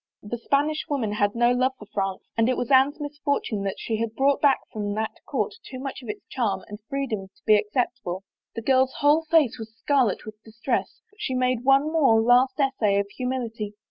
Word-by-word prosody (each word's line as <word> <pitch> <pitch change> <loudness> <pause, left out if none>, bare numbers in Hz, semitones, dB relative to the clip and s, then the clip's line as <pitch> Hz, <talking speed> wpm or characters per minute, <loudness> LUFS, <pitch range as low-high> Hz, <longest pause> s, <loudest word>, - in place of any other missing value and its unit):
The 225 +3 -5
Spanish 290 +5 +1
woman 255 -8 -1
had 205 0 0
no 240 +1 +4
love 255 +2 +2
for 210 - -11
France 195 -2 -2
and 225 +1 +2
it 255 - +1
was 245 - -3
Anne's 270 +3 +4
misfortune 290 -7 -2
that 195 - -2
she 225 - -2
had 225 0 -3
brought 275 +2 +2
back 280 -2 +4
from 205 -1 -3
that 220 0 -1 0.2
court 435 - -1
too 260 - -8
much 270 +1 -6
of 240 - -10
its 210 - -6
charm 205 -7 -1
and 210 0 -8
freedom 250 -8 -3
to 190 - -32
be 215 - +6
ac 210 0 +2
ceptable. 240 -7 -1 0.3
The 230 - -5
girl's 260 +1 +3
whole 295 +2 +5
face 310 -8 +3
was 220 0 -9
scarlet 260 -8 +1
with 215 0 -10
distress, 225 0 -3
but 420 0 -17
she 260 - -2
made 255 -1 +1
one 275 +3 +4
more 275 -9 +4
last 245 +5 +4
essay 235 -8 +2
of 200 0 0
humility. 235 -5 -4
245 Hz, 210 wpm, -25 LUFS, 215-275 Hz, 0.3 s, be